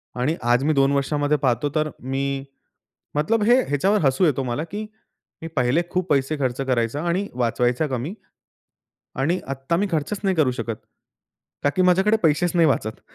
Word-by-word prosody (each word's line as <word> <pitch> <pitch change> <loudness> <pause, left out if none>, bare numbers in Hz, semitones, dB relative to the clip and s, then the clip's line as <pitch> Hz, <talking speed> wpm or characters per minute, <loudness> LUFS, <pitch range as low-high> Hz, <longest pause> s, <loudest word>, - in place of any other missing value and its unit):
आणि 135 +7 0
आज 120 +2 +2
मी 155 - +3
2 135 0 +3
वर्षामध्ये 145 +1 +1
पाहतो, 130 0 0
तर 155 0 +1
मी 135 +1 -2 0.7
मतलब 205 +10 +1
हे 245 +3 +5
ह्याच्यावर 190 +9 +2
हसू 135 +7 +3
येतो 140 -4 +2
मला 125 +6 -2
की 210 +2 -4 0.6
मी 165 - -5
पहिले 125 +7 +2
खूप 185 0 -1
पैसे 140 +2 +1
खर्च 130 -1 -1
करायचा 125 +3 0
आणि 190 +4 0
वाचवायचा 125 +3 +1
कमी 135 - -3 1.1
आणि 170 +7 +1
आत्ता 135 +4 -2
मी 205 +2 +1
खर्चच 165 +6 -1
नाही 190 -2 +1
करू 145 -5 +3
शकत. 115 -3 -4 0.9
का 145 - +4
की 185 - +2
माझ्याकडे 190 +4 +4
पैसेच 160 +3 +3
नाही 165 -2 +5
वाचत, 110 -5 -1
145 Hz, 170 wpm, -23 LUFS, 130-175 Hz, 1.1 s, हे